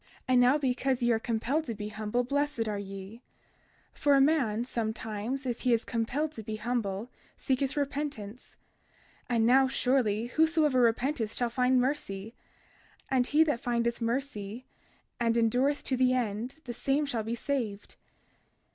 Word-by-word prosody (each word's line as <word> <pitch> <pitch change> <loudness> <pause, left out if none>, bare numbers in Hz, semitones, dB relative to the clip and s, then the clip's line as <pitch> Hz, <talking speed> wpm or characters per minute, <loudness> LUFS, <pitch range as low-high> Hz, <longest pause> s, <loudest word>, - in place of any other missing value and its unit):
32:13 - - -32 0.2
And 250 -1 +5
now, 250 +4 +5
because 260 -2 0
ye 240 - +3
are 225 - +2
compelled 240 +7 -1
to 230 - -4
be 210 0 -5
humble 215 +3 -1
blessed 285 -2 -1
are 210 -1 -2
ye; 195 +3 -8 0.7
for 285 -1 +3
a - - +5
man 265 -6 +2
sometimes, 225 +2 -3
if 245 -2 -2
he 250 -2 +3
is 230 - +1
compelled 260 +6 -1
to 230 - -8
be 215 0 -5
humble, 225 -1 -2 0.3
seeketh 270 +2 -1
repentance; 275 -6 -4 0.7
and 230 -2 +2
now 265 +3 +5
surely, 245 -5 +1
whosoever 310 0 +2
repenteth 235 0 +1
shall 240 -1 -1
find 255 +1 +3
mercy; 230 -6 -2 0.8
and 255 -2 +3
he 305 +2 +5
that 295 -7 0
findeth 235 -1 -1
mercy 230 -2 -3 0.5
and 230 -1 +2
endureth 250 +5 +2
to 260 - 0
the 255 0 +3
end 245 +5 -3
the 240 - -5
same 275 +5 0
shall 245 -5 -2
be 225 +2 -3
saved. 235 -6 -3
245 Hz, 155 wpm, -29 LUFS, 225-270 Hz, 0.8 s, And